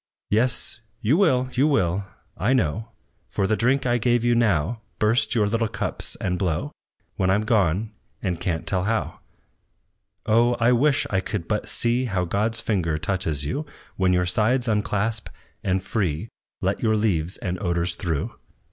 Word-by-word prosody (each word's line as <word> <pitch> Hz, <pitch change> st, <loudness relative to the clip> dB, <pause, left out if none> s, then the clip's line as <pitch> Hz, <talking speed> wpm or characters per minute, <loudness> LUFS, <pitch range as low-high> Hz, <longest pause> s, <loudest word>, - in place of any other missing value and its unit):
"Yes, 120 Hz, +1 st, 0 dB, 0.2 s
you 120 Hz, +8 st, +3 dB
will, 135 Hz, -9 st, +3 dB
you 135 Hz, +4 st, +3 dB
will, 95 Hz, -, +1 dB, 0.3 s
I 115 Hz, +7 st, +1 dB
know, 110 Hz, -, 0 dB, 0.4 s
For 100 Hz, -, 0 dB
the 110 Hz, +3 st, +2 dB
drink 130 Hz, +4 st, +2 dB
I 120 Hz, -1 st, +2 dB
give 120 Hz, 0 st, +2 dB
you 120 Hz, 0 st, +3 dB
now, 110 Hz, -2 st, +1 dB, 0.2 s
Burst 110 Hz, +1 st, +2 dB
your 110 Hz, -3 st, +3 dB
little 115 Hz, +2 st, +1 dB
cups, -, -, -4 dB
and 90 Hz, -2 st, -2 dB
blow, 85 Hz, -5 st, -1 dB, 0.5 s
When 95 Hz, -, +1 dB
I'm 100 Hz, +3 st, +3 dB
gone, 105 Hz, -1 st, +1 dB, 0.3 s
and 90 Hz, -4 st, -2 dB
can't 85 Hz, -2 st, -2 dB
tell 90 Hz, -1 st, 0 dB
how! 110 Hz, +1 st, -1 dB, 1.1 s
"Oh! 120 Hz, +2 st, +4 dB
I 120 Hz, +1 st, +3 dB
wish 135 Hz, +3 st, +3 dB
I 95 Hz, -, +2 dB
could 85 Hz, -3 st, -4 dB
but 105 Hz, -1 st, -1 dB
see 120 Hz, +2 st, +1 dB
How 95 Hz, -6 st, -1 dB
God's 110 Hz, +6 st, 0 dB
finger 85 Hz, -9 st, 0 dB
touches 80 Hz, -4 st, -1 dB
you, 145 Hz, -, -3 dB, 0.3 s
When 95 Hz, -1 st, +2 dB
your 90 Hz, 0 st, +2 dB
sides 120 Hz, +7 st, +1 dB
unclasp, 105 Hz, 0 st, 0 dB, 0.3 s
and 95 Hz, -1 st, 0 dB
free, 95 Hz, -1 st, -1 dB, 0.3 s
Let -, -, 0 dB
your 110 Hz, -1 st, +2 dB
leaves 90 Hz, -5 st, 0 dB
and 90 Hz, 0 st, -4 dB
odors 85 Hz, -2 st, 0 dB
through. 85 Hz, -6 st, -2 dB
105 Hz, 165 wpm, -24 LUFS, 90-120 Hz, 1.1 s, Oh